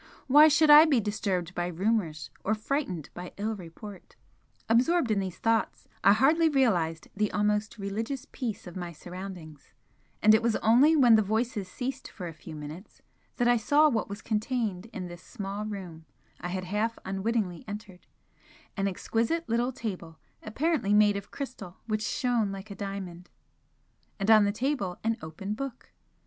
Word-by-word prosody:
Why 295 Hz, +3 st, +8 dB
should 300 Hz, 0 st, +5 dB
I 300 Hz, +2 st, +10 dB
be 285 Hz, -6 st, +3 dB
disturbed 195 Hz, -4 st, -2 dB
by 175 Hz, -1 st, -2 dB
rumours, 180 Hz, -4 st, -1 dB
or 215 Hz, -, +1 dB
frightened 215 Hz, -, -3 dB
by 180 Hz, 0 st, -8 dB
ill 215 Hz, +2 st, -2 dB
report? 190 Hz, +2 st, -11 dB, 0.5 s
Absorbed 250 Hz, +4 st, +3 dB
in 205 Hz, -, +2 dB
these 190 Hz, -2 st, -4 dB
thoughts, 225 Hz, 0 st, 0 dB, 0.2 s
I -, -, +7 dB
hardly 310 Hz, +8 st, +4 dB
realised 180 Hz, -, +1 dB
the 210 Hz, 0 st, 0 dB
almost 210 Hz, +1 st, 0 dB
religious 225 Hz, +6 st, -4 dB
peace 230 Hz, -5 st, -4 dB
of 175 Hz, -, -10 dB
my 175 Hz, -2 st, -5 dB
surroundings, 175 Hz, -3 st, -9 dB, 0.5 s
and 215 Hz, +1 st, +6 dB
it 220 Hz, -, +5 dB
was 230 Hz, -1 st, +1 dB
only 260 Hz, +8 st, +5 dB
when 245 Hz, -6 st, +6 dB
the -, -, +4 dB
voices 220 Hz, -1 st, -1 dB
ceased 260 Hz, +5 st, -5 dB
for 180 Hz, -4 st, -7 dB
a 165 Hz, -, -7 dB
few 155 Hz, 0 st, -10 dB
minutes 150 Hz, +6 st, -10 dB, 0.3 s
that 245 Hz, -, +1 dB
I 240 Hz, 0 st, +5 dB
saw 295 Hz, +7 st, +4 dB
what 225 Hz, -7 st, -1 dB
was 205 Hz, +2 st, -7 dB
contained 220 Hz, -3 st, -2 dB
in 195 Hz, -5 st, -6 dB
this 175 Hz, 0 st, -9 dB
small 200 Hz, -2 st, -5 dB
room 180 Hz, -6 st, -7 dB, 0.3 s
I 180 Hz, -, -5 dB
had 185 Hz, +1 st, -3 dB
half 210 Hz, +5 st, -1 dB
unwittingly 195 Hz, -2 st, -2 dB
entered, 205 Hz, -3 st, -9 dB, 0.7 s
an 195 Hz, -1 st, 0 dB
exquisite 230 Hz, -, -1 dB
little 235 Hz, +3 st, +1 dB
table, 185 Hz, -9 st, -6 dB, 0.2 s
apparently 235 Hz, -3 st, 0 dB
made 210 Hz, -1 st, +5 dB
of 200 Hz, 0 st, -6 dB
crystal 240 Hz, -10 st, -7 dB
which 215 Hz, -1 st, -1 dB
shone 235 Hz, -2 st, 0 dB
like 195 Hz, +2 st, -8 dB
a -, -, -6 dB
diamond 190 Hz, -3 st, -6 dB, 0.9 s
and 205 Hz, +2 st, +2 dB
on 215 Hz, -2 st, +7 dB
the 200 Hz, -, +2 dB
table, 230 Hz, -6 st, -2 dB
an 225 Hz, 0 st, 0 dB
open 160 Hz, +6 st, -5 dB
book. 260 Hz, +2 st, -7 dB
210 Hz, 165 wpm, -28 LUFS, 185-235 Hz, 0.9 s, I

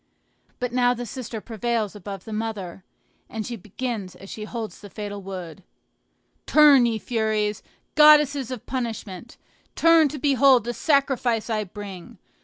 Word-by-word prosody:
But 250 Hz, -1 st, -3 dB
now 245 Hz, 0 st, +3 dB
the 245 Hz, 0 st, -5 dB
sister 235 Hz, -1 st, -6 dB
prevails 225 Hz, -1 st, -2 dB
above 195 Hz, -1 st, -8 dB
the 220 Hz, -, -7 dB
mother, 210 Hz, -5 st, -5 dB, 0.5 s
and 220 Hz, -1 st, -5 dB
she 240 Hz, -, -5 dB
begins 215 Hz, -1 st, -5 dB
as 195 Hz, -, -12 dB
she 215 Hz, -, -6 dB
holds 225 Hz, -1 st, -6 dB
the 205 Hz, -, -11 dB
fatal 205 Hz, 0 st, -6 dB
wood: 185 Hz, -3 st, -8 dB, 0.9 s
"Turn, 290 Hz, -5 st, +6 dB
ye 225 Hz, -1 st, -1 dB
Furies, 215 Hz, -2 st, -1 dB, 0.3 s
goddesses 295 Hz, -3 st, +6 dB
of 255 Hz, -4 st, -7 dB
punishment! 230 Hz, -4 st, -5 dB, 0.4 s
turn 330 Hz, -2 st, +5 dB
to 295 Hz, -, -6 dB
behold 270 Hz, -3 st, +4 dB
the 240 Hz, +1 st, -3 dB
sacrifice 265 Hz, -6 st, +1 dB
I 215 Hz, -1 st, -1 dB
bring! 195 Hz, -2 st, -10 dB
225 Hz, 145 wpm, -24 LUFS, 205-255 Hz, 0.9 s, Turn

